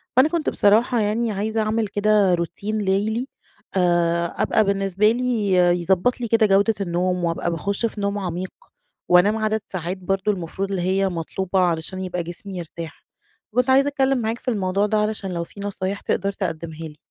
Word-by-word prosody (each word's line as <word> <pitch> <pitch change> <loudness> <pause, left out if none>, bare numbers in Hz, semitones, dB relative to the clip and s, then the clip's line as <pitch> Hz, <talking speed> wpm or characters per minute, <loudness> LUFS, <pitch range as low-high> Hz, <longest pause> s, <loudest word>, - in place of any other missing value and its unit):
فأنا 260 +4 +5
كنت 330 -1 0
بصراحة 225 +4 +3
يعني 220 +2 0
عايزة 215 +2 -1
أعمل 215 0 0
كده 205 -1 +3
روتين 200 +5 -2
لَيلي 210 +5 0 0.5
آآ، 170 -2 +2
أبقى - - +3
بالنسبة 195 +1 +2
لي 235 -4 0 0.3
يضبّط 190 +8 +1
لي 235 - -1
كده 225 0 +4
جودة 200 +2 +3
النوم 180 0 -1
وأبقى 170 0 -1
باخُش 200 +7 -1
في 215 -2 -4
نوم 200 0 -1
عميق، 185 0 -4 0.6
وأنام 180 +5 +5
عدد 220 0 0
ساعات 180 0 -4
برضه 195 +2 0
المفروض 190 +1 -4
اللي 190 -2 -1
هي 190 +1 +1
مطلوبة 185 +2 -2
علشان 180 +1 0
يبقى 180 -1 -3
جسمي 180 +3 -7
يرتاح. 165 -1 -8 0.5
فكنت 250 +1 +2
عايزة 270 +2 +5
أتكلِّم 270 -2 +1
معاك 225 +2 -2
في - - -22
الموضوع 195 -2 0
ده 215 +1 +1
علشان 210 -3 -1
لو 170 -1 -2
في 185 - -14
نصايح 200 0 -3
تقدر 195 +1 -1
تقدّمها 165 -4 -4
لي. 150 - -16
195 Hz, 170 wpm, -22 LUFS, 180-215 Hz, 0.6 s, فأنا